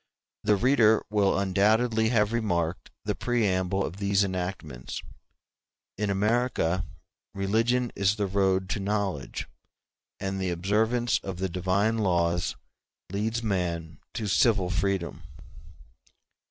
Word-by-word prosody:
The 105 Hz, -, +4 dB
reader 115 Hz, -1 st, +4 dB
will 100 Hz, -2 st, +3 dB
undoubtedly 110 Hz, +4 st, +2 dB
have 110 Hz, -2 st, +2 dB
remarked 90 Hz, -7 st, -1 dB, 0.2 s
the -, -, 0 dB
preamble 95 Hz, -5 st, 0 dB
of 90 Hz, -, -6 dB
these 100 Hz, 0 st, +2 dB
enactments: 90 Hz, -9 st, -4 dB, 0.9 s
in 105 Hz, 0 st, -1 dB
America 105 Hz, -3 st, +1 dB, 0.5 s
religion 115 Hz, +5 st, +1 dB
is 100 Hz, +1 st, +2 dB
the 105 Hz, -1 st, -1 dB
road 95 Hz, -1 st, +1 dB
to -, -, -1 dB
knowledge, 100 Hz, -7 st, -2 dB, 0.7 s
and 95 Hz, 0 st, -3 dB
the 95 Hz, -, 0 dB
observance 110 Hz, +7 st, +1 dB
of 95 Hz, -3 st, -6 dB
the 95 Hz, +1 st, -2 dB
divine 95 Hz, +5 st, +1 dB
laws 85 Hz, -3 st, +1 dB, 0.6 s
leads 110 Hz, +4 st, -1 dB
man 85 Hz, -6 st, -2 dB, 0.2 s
to 110 Hz, -, -2 dB
civil 100 Hz, -2 st, +3 dB
freedom. 95 Hz, -3 st, -1 dB
100 Hz, 115 wpm, -27 LUFS, 95-110 Hz, 0.9 s, The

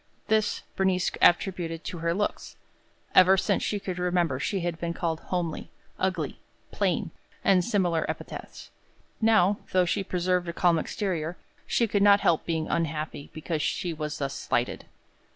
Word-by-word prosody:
This 215 Hz, -1 st, +1 dB
Bernice 190 Hz, -1 st, +1 dB
attributed 175 Hz, -2 st, +2 dB
to 175 Hz, -, -5 dB
her 170 Hz, +1 st, 0 dB
looks. 205 Hz, +4 st, -2 dB, 0.6 s
Ever 185 Hz, +1 st, +7 dB
since -, -, +1 dB
she 205 Hz, -, -1 dB
could 185 Hz, -2 st, -5 dB
remember, 175 Hz, -6 st, +1 dB
she 195 Hz, +6 st, -1 dB
had 170 Hz, -1 st, -3 dB
been 170 Hz, 0 st, -3 dB
called 165 Hz, -2 st, -1 dB
"homely," 170 Hz, -3 st, -3 dB, 0.3 s
"ugly," 185 Hz, -6 st, -1 dB, 0.3 s
"plain," -, -, 0 dB, 0.3 s
and 185 Hz, -2 st, +4 dB
similar 180 Hz, -7 st, +1 dB
epithets. -, -, -7 dB, 0.5 s
Now, 215 Hz, -3 st, +4 dB
though 185 Hz, -1 st, +4 dB
she 195 Hz, +3 st, 0 dB
preserved 180 Hz, -1 st, 0 dB
a -, -, -3 dB
calm 170 Hz, -2 st, +3 dB
exterior, 175 Hz, -3 st, -3 dB, 0.3 s
she 235 Hz, -, +2 dB
could 205 Hz, -2 st, 0 dB
not 200 Hz, 0 st, +6 dB
help 165 Hz, -4 st, +2 dB
being 160 Hz, -2 st, -1 dB
unhappy 155 Hz, -3 st, -2 dB
because 155 Hz, 0 st, -3 dB
she 175 Hz, +3 st, -1 dB
was 150 Hz, -1 st, -4 dB
thus 140 Hz, -1 st, -2 dB
slighted. 120 Hz, -2 st, -2 dB
175 Hz, 150 wpm, -27 LUFS, 165-190 Hz, 0.6 s, Ever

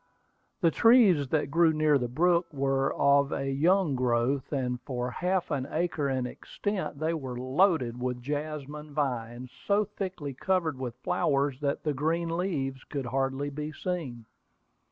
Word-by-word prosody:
The 165 Hz, -3 st, +4 dB
trees 215 Hz, -, +5 dB
that 145 Hz, 0 st, 0 dB
grew 165 Hz, 0 st, +5 dB
near 155 Hz, -2 st, +3 dB
the 125 Hz, -, -1 dB
brook 170 Hz, +6 st, +2 dB
were 135 Hz, -1 st, +1 dB
of 140 Hz, 0 st, +3 dB
a 135 Hz, 0 st, -2 dB
young 165 Hz, +3 st, +3 dB
growth, 125 Hz, +1 st, 0 dB
and 125 Hz, -3 st, -2 dB
for 125 Hz, -1 st, -3 dB
half 180 Hz, +3 st, -1 dB
an 135 Hz, -2 st, -1 dB
acre 160 Hz, -3 st, -1 dB
in 130 Hz, -2 st, -1 dB
extent 170 Hz, +3 st, -4 dB
they 160 Hz, +3 st, 0 dB
were 130 Hz, -6 st, -5 dB
loaded 130 Hz, -3 st, +1 dB
with 125 Hz, -1 st, -2 dB
jasmine 150 Hz, +1 st, -5 dB
vines 125 Hz, -3 st, -2 dB, 0.2 s
so 205 Hz, +1 st, +3 dB
thickly 185 Hz, -8 st, -5 dB
covered 165 Hz, -1 st, 0 dB
with 125 Hz, -3 st, -4 dB
flowers 140 Hz, -1 st, +1 dB
that 140 Hz, -1 st, -1 dB
the 150 Hz, -, 0 dB
green 165 Hz, +4 st, -1 dB
leaves 140 Hz, -8 st, -2 dB
could 140 Hz, -3 st, -4 dB
hardly 135 Hz, +3 st, -1 dB
be 150 Hz, +2 st, -5 dB
seen. 145 Hz, -9 st, -4 dB
145 Hz, 155 wpm, -28 LUFS, 130-165 Hz, 0.2 s, trees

